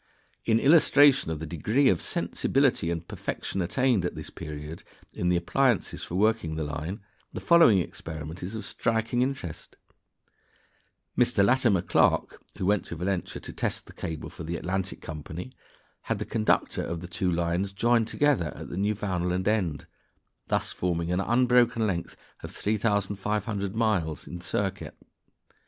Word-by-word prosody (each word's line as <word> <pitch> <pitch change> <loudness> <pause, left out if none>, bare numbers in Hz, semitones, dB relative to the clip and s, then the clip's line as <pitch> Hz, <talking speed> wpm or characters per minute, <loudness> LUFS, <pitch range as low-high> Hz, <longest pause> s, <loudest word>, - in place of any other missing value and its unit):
In 115 -1 +3
illustration 145 - +5
of 80 - -2
the 80 - -5
degree 105 - +1
of 90 - +3
sensibility 135 -11 +1
and 85 0 -3
perfection 95 - -4
attained 120 +3 +2
at 90 - -2
this - - -7
period 75 0 -7 0.3
in 90 - -1
the 90 - +3
appliances 120 +6 +1
for 85 - -5
working 105 -5 +1
the 80 - -2
line, 75 +7 -4 0.3
the - - -4
following 170 - +6
experiment 80 -1 -5
is 95 +5 -5
of 110 -3 -5
striking 115 +4 0
interest: 130 - -4 1.4
Mr. 100 - +4
Latimer 120 -7 +3
Clark, - - +2 0.2
who - - -2
went 100 +1 +2
to - - -6
Valentia 90 +2 -2
to - - -7
test - - -2
the - - -14
cable 80 -2 -6
for - - -9
the 85 +2 -3
"Atlantic" 95 +2 -3
Company, 80 - -7 0.6
had - - +1
the - - -4
conductor 110 -2 +1
of 85 -1 -4
the 90 - -7
two 90 +1 -1
lines 85 +3 0
joined 115 +3 +2
together 135 - +1
at - - -8
the - - -6
Newfoundland 95 -3 -1
end, 90 -9 0 0.6
thus - - 0
forming 85 -1 -1
an 90 - +1
unbroken 120 0 +3
length 90 -5 -3 0.2
of - - -7
3,700 100 -1 -1
miles 100 -9 0
in 90 0 -8
circuit. - - -3
95 Hz, 150 wpm, -27 LUFS, 85-115 Hz, 1.4 s, following